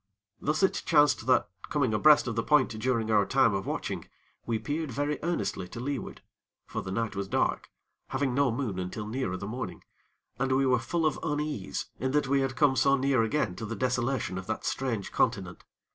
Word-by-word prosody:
Thus 155 +5 0
it 190 - +2
chanced 145 -7 +3
that, 125 -1 +4 0.2
coming 135 -7 +1
abreast 150 +7 +6
of 120 -3 -3
the 115 - +1
point 150 0 +3
during 110 0 -1
our 105 -2 +5
time 130 0 +3
of 95 0 -2
watching, - - -4 0.4
we 115 -1 +1
peered 145 +8 -3
very 145 +4 -1
earnestly 165 - -2
to 115 - -8
leeward; 135 +2 -4 0.4
for - - -4
the - - -7
night 110 +1 -2
was 100 0 -3
dark, - - 0 0.4
having 135 -1 -1
no 140 -1 +3
moon 115 -6 -2
until 95 +4 -4
nearer 110 -4 -2
the 100 - -6
morning; 120 +5 -5 0.6
and 130 0 +1
we 135 +1 +3
were 125 -2 +3
full 160 +8 -1
of 155 - +1
unease 150 -8 -2
in 130 +2 -1
that 150 -1 +3
we 140 +1 +2
had 135 -1 -1
come 145 -2 +4
so 140 +1 +4
near 135 -2 +2
again 110 -5 0
to 110 - -5
the - - -4
desolation 125 -6 -1
of 95 - -9
that 110 - -3
strange 120 -7 -2
continent. 100 -8 -1
130 Hz, 200 wpm, -29 LUFS, 110-140 Hz, 0.6 s, abreast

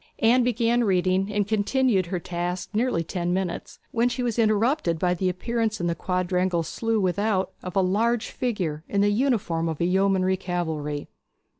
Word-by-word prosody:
Anne 245 +3 +4
began 235 0 +2
reading, 190 0 +1
and 205 -1 0
continued 220 -1 +2
at - - -12
her 180 - -1
task 175 +1 -4
nearly 220 -6 +1
ten 175 +1 -2
minutes, 180 -1 -3
when 235 +1 +2
she 250 +1 -3
was 235 -1 -1
interrupted 215 - +2
by 180 +2 +1
the 185 +1 0
appearance 225 +4 -1
in 175 - -2
the 170 - +1
quadrangular 180 0 0
slough 225 +4 -1
without 190 +1 0
of 180 +1 -7
a 195 - +4
large 220 +5 +1
figure 180 -11 -2
in 200 - +1
the 205 0 +3
uniform 205 -9 0
of 160 - -3
the 170 - 0
yeomanry 190 0 +2
cavalry. 160 -5 -3
190 Hz, 175 wpm, -25 LUFS, 175-225 Hz, -, Anne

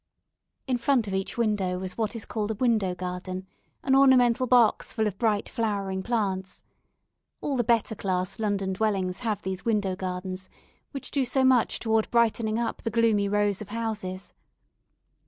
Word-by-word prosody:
In 255 -2 0
front 255 -3 +2
of 195 - -4
each 190 +5 -3
window 205 -6 0
was 185 0 -5
what 225 0 -2
is 225 - -5
called 215 -2 -3
a 220 - -1
window 215 -6 +1
garden, 185 +1 -5 0.4
an 265 0 +3
ornamental 255 -2 +5
box 240 -3 +4
full 220 -1 0
of 200 -2 -3
bright 215 -3 +1
flowering 200 -4 -2
plants. 190 -4 -2 0.8
All 285 - -2
the 245 - +1
better 230 -1 +2
class 185 -1 -2
London 200 -3 -1
dwellings 190 -3 -1
have 220 -5 -2
these 190 0 -4
window 205 -5 0
gardens, 185 0 -5 0.4
which 275 - -7
do 275 - +1
so 260 +1 +1
much 260 -3 +3
toward 220 -1 +1
brightening 230 -2 +2
up 235 0 -2
the - - -2
gloomy 215 -3 +2
rows 205 -1 +1
of 210 - -8
houses. 210 -4 -4
215 Hz, 165 wpm, -27 LUFS, 190-235 Hz, 0.8 s, ornamental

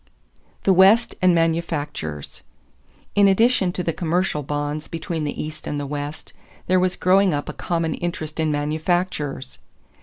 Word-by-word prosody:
=The 195 - +4
West 195 +6 +5
and 180 -1 +5
Manufactures.= 155 - -2 0.7
In 205 -1 +5
addition 195 -1 +3
to 180 - -3
the 165 - -1
commercial 170 -1 0
bonds 145 +2 -3
between 165 -1 -4
the 145 - -4
East 155 0 -8
and 145 - -2
the 145 - -3
West 145 +1 -6 0.3
there 185 0 +3
was 185 0 +1
growing 190 -2 +3
up 145 - -4
a - - -5
common 165 -2 -1
interest 160 -3 -5
in 160 -1 +1
manufactures. 150 -2 -2
165 Hz, 150 wpm, -22 LUFS, 150-185 Hz, 0.7 s, West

